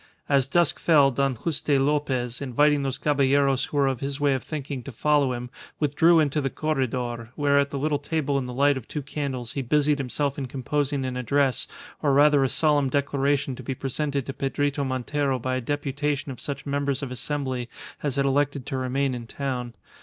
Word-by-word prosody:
As 135 -2 +3
dusk 170 +2 +2
fell 145 -5 +5
Don 135 0 0
Juste 145 +2 0
Lopez, 135 -4 0
inviting 145 +2 +3
those 135 -1 -2
caballeros 140 -1 +2
who 145 - -5
were 140 - +4
of 135 -3 0
his 140 +1 -4
way 145 -1 +3
of 130 - -1
thinking 140 -3 -5
to 140 - -8
follow 145 +2 +2
him, 120 0 -6 0.3
withdrew 160 +3 +4
into 150 -1 +1
the 135 - -1
corredor, 125 -6 -2
where 140 -1 +3
at 140 0 0
a 140 - -3
little 145 +1 0
table 145 -2 -1
in 130 - -4
the - - -5
light 140 +1 +3
of 120 - -8
two 150 - -4
candles 130 -4 -4
he 140 - -2
busied 145 +3 +2
himself 140 +2 -2
in 135 - -3
composing 140 +2 -1
an 125 -1 -3
address, 135 0 +1 0.3
or 145 -2 +2
rather 145 0 +5
a 135 - +1
solemn 145 -3 +2
declaration 140 0 0
to - - -9
be 135 - -4
presented 140 +1 -2
to 135 - -5
Pedrito 140 +1 -1
Montero 135 +1 -1
by 130 +1 -2
a - - -3
deputation 145 +1 -2
of 125 - -9
such 145 - -5
members 140 -1 -1
of 130 - -4
Assembly 130 -2 -3 0.3
as 145 -3 -1
had 140 -1 +1
elected 140 -1 +1
to 135 - -3
remain 130 +1 0
in 120 -2 -6
town. 125 -3 -4
140 Hz, 200 wpm, -25 LUFS, 130-145 Hz, 0.3 s, fell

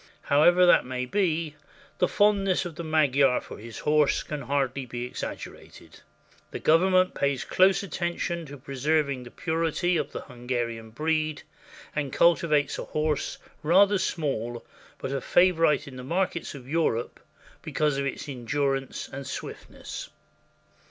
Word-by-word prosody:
However 175 +5 +5
that 175 - +6
may 125 0 -3
be, 165 -1 0 0.5
the 180 - +4
fondness 195 -2 +2
of 175 - -5
the 170 - -6
Magyar 140 -4 +3
for - - -11
his 115 +1 -9
horse 150 -1 +2
can 150 -2 -5
hardly 135 -1 -1
be 120 -1 -5
exaggerated. 125 - -8 0.5
The - - -5
Government 185 +3 +3
pays 140 -2 0
close 190 +1 +4
attention 175 -2 -3
to 145 +1 -9
preserving 140 +1 0
the 120 - -10
purity 165 +3 0
of - - -2
the - - -5
Hunga 125 -2 -3
rian 115 -1 -8
breed, 155 +3 -1 0.5
and 145 -3 -2
cultivates 155 -4 +3
a - - -4
horse 155 -1 -1 0.2
rather 195 +5 +4
small, 120 - -2 0.3
but - - -5
a 135 -1 -2
favorite 165 -5 +3
in 130 -2 -9
the 125 - -7
markets 170 +2 -2
of 130 -3 -11
Europe 140 -6 -1 0.4
because 150 -2 0
of 140 - -1
its 140 - -5
endurance 135 +1 -2
and 140 0 -7
swift - - -7
ness. - - -8
150 Hz, 145 wpm, -27 LUFS, 135-170 Hz, 0.5 s, that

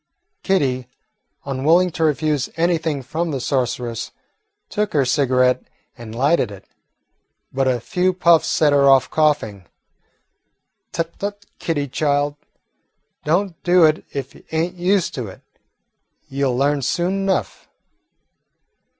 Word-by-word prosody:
Kitty, 130 -10 0 0.6
unwilling 155 +7 +2
to 165 0 -2
refuse 150 -2 +1
anything 165 -4 0
from 165 +7 -3
the 140 -3 -2
sorceress, 120 -3 -2 0.6
took 210 0 -2
her 140 -3 +3
cigarette 125 -1 +2 0.3
and 115 -2 -10
lighted 140 +2 +2
it, 100 -2 -12 0.9
but 135 0 +1
a 125 -2 +1
few 180 +9 0
puffs 170 -3 +3
set 150 -2 +3
her 140 -1 +5
off 135 -1 +4
coughing. 110 - 0 1.2
"Tut, 165 0 -4
tut, 205 0 -5
Kitty, 145 -4 -1
child, 145 +1 0 0.9
don't 175 +2 0
do 175 -1 +5
it 155 0 +2
if 135 -1 -5
you - - -17
ain't 165 +3 -1
used 185 +1 +1
to 125 -7 -4
it. 95 - -12 0.8
You 140 0 -1
'll 125 - -1
learn 140 +1 +1
soon 175 +8 0
enough." 195 -1 -2
145 Hz, 125 wpm, -20 LUFS, 130-170 Hz, 1.2 s, her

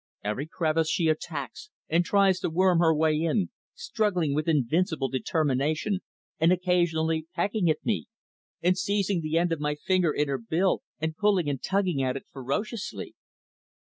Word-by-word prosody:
Every 105 +8 -2
crevice 160 -1 0
she 160 0 +2
attacks, 155 - -4 0.2
and 170 +2 +2
tries 195 0 +3
to - - -1
worm 180 +1 +3
her 165 -1 +5
way 155 0 +2
in, 170 +4 0 0.2
struggling 180 -9 0
with 155 +2 -1
invincible 155 0 +1
determination 155 - 0 0.4
and 165 +2 +4
occasionally 165 -3 +1
pecking 190 0 +1
at 155 - -1
me, 220 0 -1 0.6
and 180 +1 +4
seizing 200 -1 0
the 155 +1 -1
end 170 0 +2
of 165 - -1
my 150 0 -1
finger 180 +1 +1
in 150 0 0
her 135 -1 -1
bill 165 +11 +1 0.2
and 160 0 -2
pulling 195 -4 +2
and 140 -3 -2
tugging 190 -7 0
at 130 -1 0
it - - -10
ferociously. 195 - -4
165 Hz, 160 wpm, -27 LUFS, 150-185 Hz, 0.6 s, her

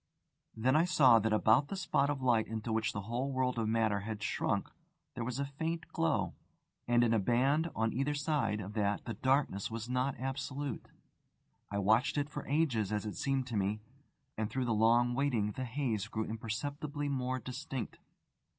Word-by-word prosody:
Then 130 +5 +2
I 155 - +5
saw 130 -9 +6
that 110 +1 0
about 110 +6 +4
the 195 - -4
spot 145 -6 +1
of 140 -3 -2
light 115 -3 +3
into 110 0 -3
which 110 -2 +1
the 100 - -4
whole 120 +6 -2
world 130 -2 0
of 110 - 0
matter 110 -2 +2
had 105 0 -5
shrunk - - 0 0.5
there 120 - -4
was 125 +1 -3
a 140 - 0
faint 160 +4 -3
glow. 165 -2 0 0.5
And 120 0 +4
in 115 -1 +3
a 115 - +3
band 135 - +2
on 110 0 0
either 140 +4 0
side 140 -8 0
of 100 +1 -7
that 105 -2 0
the 115 - -3
darkness 130 -3 +1
was 115 0 -5
not 125 +1 -1
absolute. 135 0 -4 0.8
I 100 - -3
watched 110 +8 +3
it 145 0 -1
for 145 - -6
ages, 130 -9 +1
as 105 0 -1
it 105 -4 -4
seemed 135 +6 0
to 115 - -3
me, 100 +1 0 0.6
and 110 -1 -1
through 130 0 -1
the 115 - +1
long 120 +3 +4
waiting 120 -6 +1
the 130 +5 -4
haze 115 -5 -2
grew 110 0 -2
imperceptibly 145 +7 -4
more 130 -2 -1
distinct. 130 0 -5
120 Hz, 185 wpm, -33 LUFS, 110-140 Hz, 0.8 s, saw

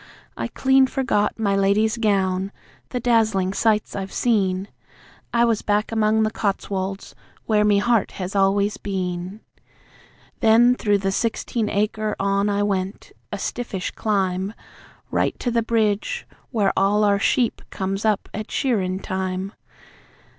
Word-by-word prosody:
I - - -3
clean 265 0 +3
forgot 255 -6 0
My 200 -3 +1
Lady's 205 +3 +2
gown, 195 -3 +1 0.4
the 250 - -2
dazzlin' 220 -6 +2
sights 215 0 +1
I've 195 -1 -4
seen; 195 -5 +1 0.6
I 235 0 +3
was 230 -2 +1
back 210 +1 0
among 220 0 +2
the 215 - 0
Cotswolds, 195 -2 -3 0.3
where 210 -1 +3
me 210 -1 +4
heart 230 +2 +1
has 190 +1 -5
always 200 +1 +2
been. 185 0 -4 1.0
Then 230 +3 +5
through 205 -4 +1
the 195 -1 -1
sixteen 225 +1 -1
acre 210 +1 -1
on 200 +1 +1
I 205 0 +1
went, 195 -1 -2 0.2
a - - -3
stiffish 220 -6 -4
climb, 195 -1 -1 0.6
Right - - 0
to 245 - -2
the 230 0 +2
bridge, 225 - 0 0.2
where 210 -5 +1
all 205 +2 +3
our 200 -1 +3
sheep 240 +3 +1
comes 195 0 -3
up 215 -2 +1
at 215 +1 -5
shearin' 190 -7 0
time. 190 +1 -3
205 Hz, 140 wpm, -22 LUFS, 195-220 Hz, 1.0 s, Then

